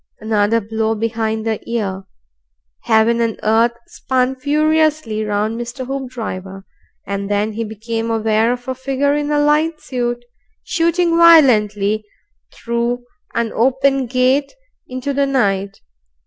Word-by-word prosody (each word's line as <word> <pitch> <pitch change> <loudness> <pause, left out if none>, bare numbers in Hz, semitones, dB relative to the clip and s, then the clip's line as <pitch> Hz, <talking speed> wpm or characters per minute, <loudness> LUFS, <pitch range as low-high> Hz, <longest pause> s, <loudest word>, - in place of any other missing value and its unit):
Another 215 +1 +1
blow 220 +1 -1
behind 220 0 -2
the 220 -1 -1
ear. 195 -5 -3 0.8
Heaven 230 +2 +3
and 230 -2 -1
earth 225 +2 +3
spun 255 0 -1
furiously 305 -4 +1
round 215 +2 -1
Mr. 240 +2 -6
Hoopdriver, 225 -8 -6 0.4
and 200 0 -4
then 205 +1 0
he 230 +2 -3
became 225 +1 -4
aware 225 0 +1
of 245 0 -5
a 260 - -1
figure 270 +2 0
in 295 0 -1
a 295 - +1
light 305 +2 +2
suit 240 -1 -3 0.4
shooting 335 0 +1
violently 215 -11 +5 0.5
through 235 +1 -2 0.3
an 230 -1 -1
open 265 +2 +2
gate 255 +3 +1 0.4
into 255 +2 -4
the 280 0 +1
night. 200 -7 0
235 Hz, 125 wpm, -18 LUFS, 220-270 Hz, 0.8 s, violently